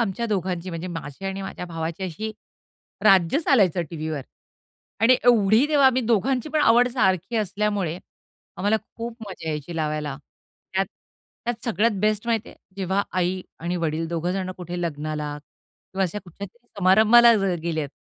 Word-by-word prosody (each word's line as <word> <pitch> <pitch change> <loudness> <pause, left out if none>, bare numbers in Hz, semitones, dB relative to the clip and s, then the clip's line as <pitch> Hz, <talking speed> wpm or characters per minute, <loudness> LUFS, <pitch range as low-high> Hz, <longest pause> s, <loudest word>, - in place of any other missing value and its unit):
आमच्या 230 +1 -1
दोघांची 185 -3 -2
म्हणजे 165 +1 -5
माझी 165 +1 -7
आणि 195 0 -3
माझ्या 190 -1 -6
भावाची 165 +2 -4
अशी 215 +6 -4 0.7
राज्य 195 - +5
चालायचं 195 - +3
टीव्हीवर. 155 -3 -4 0.8
आणि 245 +3 +6
एवढी 225 +2 +5
तेव्हा 290 -3 +5
आम्ही 260 -1 +3
दोघांची 245 +5 +1
पण 305 0 +1
आवड 245 -2 +5
सारखी 195 -3 +1
असल्यामुळे, 205 -4 -1 0.6
आम्हाला 205 +3 +2 0.2
खूप 230 0 -5
मजा 170 -4 -7
यायची 155 +2 -4
लावायला. 150 -3 -2 0.6
त्यात, 195 0 +2 0.6
त्यात 235 -1 -3
सगळ्यात 230 -1 +2
बेस्ट 215 +2 +1
माहिती 225 -2 0
आहे - - -14 0.2
जेव्हा 190 +1 0 0.2
आई 185 +1 0 0.2
आणि 175 +2 -2
वडील 165 -1 -1
दोघं 170 +1 -1
जण 185 -1 -2
कुठे 175 0 -5
लग्नाला 150 -2 -3
किंवा 190 +5 -8
अशा 185 +4 -3
कुठल्यातरी 200 +7 -11
समारंभाला 220 +5 +7
जर 195 -3 +1
गेले 165 -2 -1
आहेत. 140 -2 -4
190 Hz, 155 wpm, -24 LUFS, 170-225 Hz, 0.8 s, समारंभाला